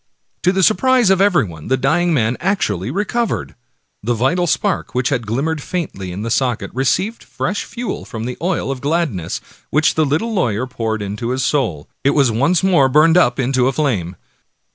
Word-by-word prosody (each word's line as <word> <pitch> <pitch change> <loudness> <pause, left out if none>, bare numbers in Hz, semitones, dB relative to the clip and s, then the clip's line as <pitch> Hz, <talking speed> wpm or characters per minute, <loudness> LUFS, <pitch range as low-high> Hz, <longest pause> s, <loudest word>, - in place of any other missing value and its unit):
To 180 - +3
the 190 0 +1
surprise 245 +1 +4
of 190 0 +3
everybody 120 - +1
the 130 - +2
dying 160 +7 +1
man 120 -6 +1
actually 120 - -1
recovered. 210 - -2 0.5
The 120 +3 0
vital 150 +10 +1
spark, 150 - -1
which 125 0 +1
had 115 -3 -2
glimmered 145 +8 -1
faintly 135 - -4
in 95 +4 -5
the 115 - -3
socket, 125 -1 0
received 185 - 0
fresh 205 +3 -3
fuel 240 0 -5
from 115 -3 -6
the 125 0 -4
oil 170 -6 -1
of 130 -2 -5
gladness 140 - -1 0.3
which 150 +1 +2
the 160 - +2
little 160 +11 0
lawyer 125 - 0
poured 110 -4 -3
into 105 +4 -4
his 130 +1 -1
soul. 110 - -1 0.2
It 140 - +2
once 140 - +2
more 170 -9 +4
burned 155 +4 +5
up 125 -9 +4
into 130 -1 +2
a - - +2
flame. 105 - -1
135 Hz, 180 wpm, -18 LUFS, 115-175 Hz, 0.5 s, burned